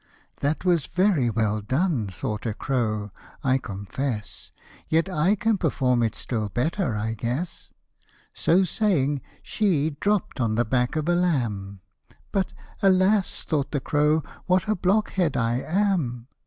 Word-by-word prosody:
" - - -42
That 150 +6 -1
was 175 -5 +2
very 180 - +2
well 110 -1 0
done," 130 - 0
thought 105 +4 -4
a 105 - -2
cro, 110 -7 -1 0.2
" - - -24
I 130 - +3
confess; 105 +3 -5 0.4
Yet 165 +3 +2
I 185 +2 +2
can 220 -1 +1
perform 130 -7 +1
it 115 -1 0
still 110 -4 -2
better, 150 - -1
I 110 +2 -2
guess: 125 - -4 0.3
" - - -38 0.3
So 180 +3 +3
saying, 150 -8 +1 0.2
she 160 -8 +1
dropt 205 -7 0
on 110 -2 +1
the 120 +2 +2
back 125 +4 0
of 155 0 -1
a 175 - +3
lamb, 115 - -1 0.5
But 195 -2 0 0.2
" - - -24
alas! 190 +1 +3
" - - -21
thought 145 -4 0
the 145 - -1
crow, 150 +3 +2
" - - -24
what 185 +1 +2
a 215 - +3
blockhead 190 -3 +1
I 120 +1 +1
am!" 170 - 0
145 Hz, 165 wpm, -25 LUFS, 115-180 Hz, 0.5 s, I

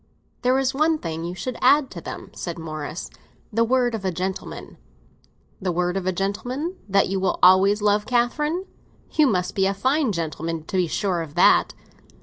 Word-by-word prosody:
"There 255 +1 +3
is 270 -1 +1
one 310 +3 +2
thing 165 - -5
you 175 +1 -5
should 240 +7 -5
add 275 +2 +4
to - - -8
them," - - -8
said 170 -2 -5
Morris; 155 0 -5 0.5
"the 230 +2 +3
word 245 0 +2
of 220 -3 -4
a 190 - +1
gentleman!" 185 +2 -5 0.8
"The 185 -1 0
word 180 +1 0
of 190 -1 -2
a - - +3
gentleman 245 - -3
that 195 0 +3
you 195 0 -1
will 190 - 0
always 195 +3 +6
love 210 0 +2
Catherine? 295 +9 0 0.5
You 305 -2 +4
must 180 -6 0
be 195 -1 +2
a 195 - 0
very 195 - -17
fine 270 -1 +2
gentleman 165 -2 -3
to 190 - -3
be 180 -2 +2
sure 185 0 -1
of 155 -2 -8
that." 175 - +4
195 Hz, 190 wpm, -23 LUFS, 180-255 Hz, 0.8 s, always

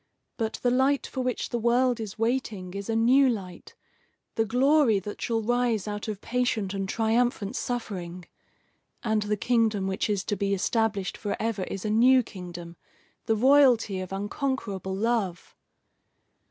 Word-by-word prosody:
But 220 -2 -2
the 245 - +3
light 265 +2 +2
for 260 - -4
which 250 -2 -2
the 240 - -2
world 245 +1 +2
is 215 -2 -6
waiting 225 -6 -2
is 200 +2 -6
a 225 - 0
new 255 +4 +5
light, 185 -7 -6 0.6
the 225 - +1
glory 255 0 +3
that 205 +2 -6
shall 225 -1 -1
rise 240 -2 0
out 210 +1 -4
of 210 -2 -5
patient 230 -5 -1
and 195 -1 -3
triumphant 225 -2 0
suffering. 185 -8 -4 0.8
And 220 -2 +1
the 210 0 -1
kingdom 225 -3 +1
which 190 +2 -1
is 200 -2 0
to 205 - -2
be 200 0 0
established 205 -1 -1
forever 210 -1 -2
is 195 +2 -6
a 210 - 0
new 250 +4 +5
kingdom, 175 -4 -9 0.5
the 225 - +3
royalty 245 -5 +4
of 185 - -7
unconquerable 200 -2 -3
love. 205 -4 -2
220 Hz, 155 wpm, -27 LUFS, 195-245 Hz, 0.8 s, new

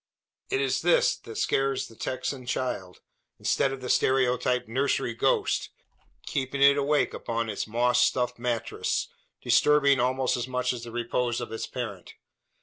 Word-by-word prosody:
It 400 0 0
is 420 - 0
this - - +3
that 440 - -11
scares 135 - 0
the 115 - -16
Texan 130 +2 -4
child 120 -7 -3 0.4
instead 135 - +1
of 135 -1 -6
the 125 - -5
stereotyped 125 -2 +2
nursery 130 0 0
ghost, 115 - +1 0.6
keeping 135 +1 -3
it 140 0 +7
awake 145 +1 +1
upon 115 -1 -3
its 105 - -4
moss 120 +3 +3
stuffed 125 -1 0
mattress 120 -2 -2 0.3
disturbing 140 -2 +4
almost 130 +1 +1
as 120 - -3
much 125 -1 0
the 120 -1 -6
repose 120 0 -1
of 120 - -6
its 115 - -4
parent. 110 -8 -6
125 Hz, 145 wpm, -27 LUFS, 120-135 Hz, 0.6 s, it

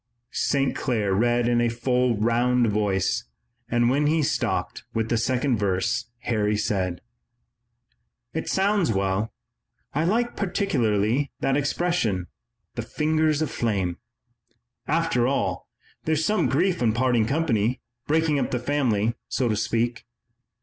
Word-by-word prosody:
St. 135 -1 +1
Clair 110 -7 0
read 120 +4 +2
well 120 - +2
in 120 - +3
a 120 - +2
full, 125 0 +1
round 120 +3 +2
voice, 100 -3 0 0.4
and 120 0 +2
when 140 +4 +2
he 155 +1 +2
stopped - - -1
with 115 0 0
the - - +2
second 130 +1 +1
verse 100 +4 0
Harry 105 -4 0
said: 95 -4 -1 1.3
"It 160 - -3
sounds 195 - +2
well. 95 +2 0 0.6
I 155 - +1
like 235 +6 +1
particularly 135 - 0
that 135 - +2
expression, 140 - 0 0.5
'the - - -3
fingers 155 0 +1
of 155 - -3
flame.' 95 -7 -1 0.9
After 155 -6 +1
all, 135 - -1 0.4
there's 160 0 +1
some 215 0 +2
grief 175 +4 +1
in 115 -3 +3
parting 120 -2 +2
company, 125 -6 +1 0.3
breaking 155 -1 +2
up - - -1
the 125 - -1
family, 120 -5 +1 0.2
so 125 -3 0
to 110 - +1
speak." 115 +3 -1
120 Hz, 135 wpm, -25 LUFS, 110-150 Hz, 1.3 s, in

